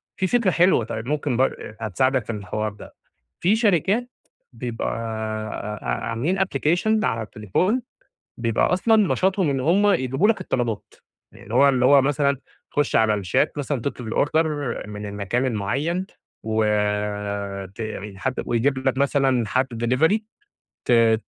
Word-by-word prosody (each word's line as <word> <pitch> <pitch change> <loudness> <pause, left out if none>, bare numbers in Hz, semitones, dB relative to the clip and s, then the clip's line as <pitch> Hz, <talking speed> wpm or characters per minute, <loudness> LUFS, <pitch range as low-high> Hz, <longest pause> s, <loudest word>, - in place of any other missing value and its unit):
في 190 - 0
فكرة 230 -3 +2
حلوة، 175 - +3
طيب 110 0 -5
ممكن 145 -4 -1
بر 130 -4 -1
هتساعدك 125 +4 +1
في 115 - -3
الحوار 105 +1 -3
ده، - - -13 0.5
في 190 +6 +3
شركات 215 +3 +2 0.4
بيبقى 120 -3 -4 0.9
آآ - - -11
عاملين 115 - -1
application 190 +5 +1
على 115 -2 0
التليفون، 110 - -1 0.6
بيبقى 115 +6 +1
أصلًا 220 +5 +3 0.2
نشاطهم 190 +2 +1
إن 135 -1 0
هُم 185 +9 +3
يجيبوا 135 - +2
لك 225 - +2
الطلبات، 120 - -3 0.4
يعني - - -15
اللي - - -7
هو 140 - +6
اللي 125 -2 +2
هو 140 +1 +7
مثلًا 140 0 +1 0.3
تخُش 145 -1 +1
على 110 -1 +4
الشات 105 - 0
مثلًا 145 -3 -2
تطلُب 125 -5 -4
الorder 160 +2 +2 0.4
من 105 0 -6
المكان 100 +6 -1
المعيّن 140 - -1 0.4
وت 105 -2 -1 0.3
حد 130 +6 -2
ويجيب 130 +3 +1
لك 130 0 -1
مثلًا 135 -4 +2
حد 130 +1 +1 0.2
delivery 160 - +3 0.7
ت 115 -2 +4
130 Hz, 140 wpm, -23 LUFS, 110-160 Hz, 0.9 s, هو